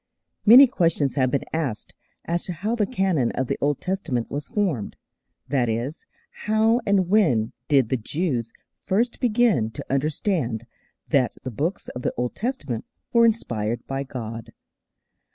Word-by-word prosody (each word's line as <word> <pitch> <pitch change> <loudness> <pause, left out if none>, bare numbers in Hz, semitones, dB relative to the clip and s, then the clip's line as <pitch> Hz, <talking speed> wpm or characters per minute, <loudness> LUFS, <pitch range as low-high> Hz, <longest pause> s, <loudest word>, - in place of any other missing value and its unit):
Many 250 +6 +11
questions 165 - +1
have 130 -3 +2
been 140 - -1
asked 145 -9 -3 0.3
as 170 +1 -1
to 180 - -3
how 205 +8 -2
the 210 -4 +1
canon 190 - +1
of 130 - -1
the - - -3
Old 145 -1 +1
Testament 180 - -2
was 145 +1 -3
formed 185 - -1 0.5
that 130 -3 +1
is, 120 +8 -3 0.4
how 220 +3 +3
and 195 -3 +3
when 155 - +2
did 135 -6 +3
the 130 - +1
Jews 125 -2 -2 0.3
first 230 +5 0
begin 230 - +2
to 110 - -8
understand 140 - 0 0.4
that 135 -5 +2
the 130 - -4
Books 155 - -2
of 125 - -7
the - - -2
Old 125 0 -1
Testament 155 - -3 0.3
were 235 -1 +6
inspired 120 - -1
by 135 0 -3
God. 115 -4 -7
145 Hz, 155 wpm, -24 LUFS, 120-200 Hz, 0.5 s, Many